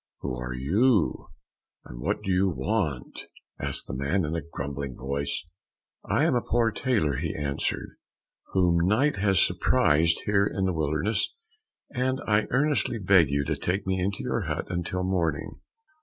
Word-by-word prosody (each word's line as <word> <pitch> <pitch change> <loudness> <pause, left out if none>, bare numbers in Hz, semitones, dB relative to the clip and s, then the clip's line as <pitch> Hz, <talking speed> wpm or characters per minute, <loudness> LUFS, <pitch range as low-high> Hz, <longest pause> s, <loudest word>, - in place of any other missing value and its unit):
"Who 65 - -3
are 60 0 -4
you, 100 - +2 0.6
and - - -10
what - - -2
do 95 - -1
you 95 +1 +3
want?" 80 - -2 0.4
asked - - -3
the - - -7
man 70 +8 0
in 75 +2 -2
a 85 - -1
grumbling 70 -4 -5
voice. 70 +4 -3 0.6
"I - - +1
am - - +3
a 120 - +2
poor 115 -1 +1
tailor," 105 - 0
he 80 +2 -3
answered, 70 -2 -3 0.6
"whom 90 -2 +3
night 130 +8 +2
has 95 -1 +3
surprised 80 +3 +3
here 100 -1 +3
in 95 -2 -1
the 95 - +1
wilderness, 80 +7 0 0.6
and 130 +1 0
I 105 0 +2
earnestly 140 -2 +1
beg 90 -6 +4
you 70 +1 0
to 75 +1 -1
take 90 +7 -2
me 95 0 0
into 100 +2 -2
your - - -1
hut - - -2
until 90 +1 -2
morning." 85 -5 -1
90 Hz, 160 wpm, -27 LUFS, 70-105 Hz, 0.6 s, beg